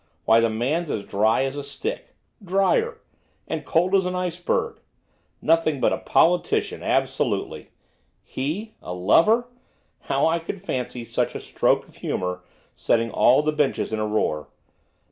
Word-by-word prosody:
Why, 115 +1 +6
the 115 0 +2
man's 140 +10 -1
as 105 - -2
dry 110 +6 +2
as 135 +1 -2
a 145 - -4
stick, 380 - -5 0.3
drier! 440 - +1 0.5
And 160 -1 -3
cold 175 +6 +1
as 190 -2 +3
an 180 - -3
iceberg. 180 -1 -2 0.6
Nothing 160 -3 +2
but - - +2
a - - -2
politician, 175 +1 +2
absolutely. - - -1 0.5
He 185 +12 -4
a 90 - -6
lover! 215 - +4 0.6
how - - +2
I 165 +1 +2
could 170 +4 -6
fancy 125 -9 -4
such - - -1
a - - -3
stroke - - 0
of - - -19
humour 90 0 -3 0.3
setting 115 0 0
all 130 +5 +4
the 155 - +1
benches 150 -6 0
in 110 - -1
a 110 - -1
roar. 90 -8 -1
150 Hz, 150 wpm, -24 LUFS, 115-180 Hz, 0.6 s, Why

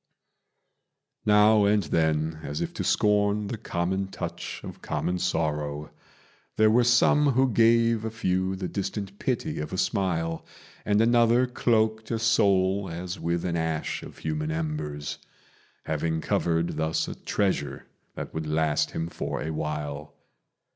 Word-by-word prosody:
Now 105 0 +6
and 105 0 +3
then, 80 0 0
as 75 0 -4
if - - -3
to - - -3
scorn 105 0 +2
the 115 - -3
common 95 -1 -1
touch 95 - -6
of - - -9
common 90 0 -2
sorrow, 75 -4 -2 0.7
There 110 0 +5
were 120 +2 +5
some 135 +4 +4
who 130 +1 +3
gave 115 0 +4
a 110 - -2
few 95 -4 -1
the 95 -1 -4
distant 100 0 -4
pity 120 - -2
of 75 0 -4
a 95 - -3
smile; 85 -5 -1 0.4
And 105 +1 +3
another 120 +1 +4
cloaked 110 -3 +1
a 115 - 0
soul 100 -3 +2
as 90 +3 -5
with 85 +1 -1
an 85 -2 -1
ash 80 -2 -2
of - - -11
human 75 -1 -3
embers, 75 -2 -3 0.7
Having 80 +1 -1
covered 85 0 0
thus 80 0 0
a - - -4
treasure 75 -10 -2 0.3
that - - -6
would 80 -1 -4
last 75 -1 +1
him 80 - -1
for - - -4
a 80 - -3
while. 75 -1 -4
95 Hz, 145 wpm, -26 LUFS, 80-110 Hz, 0.7 s, Now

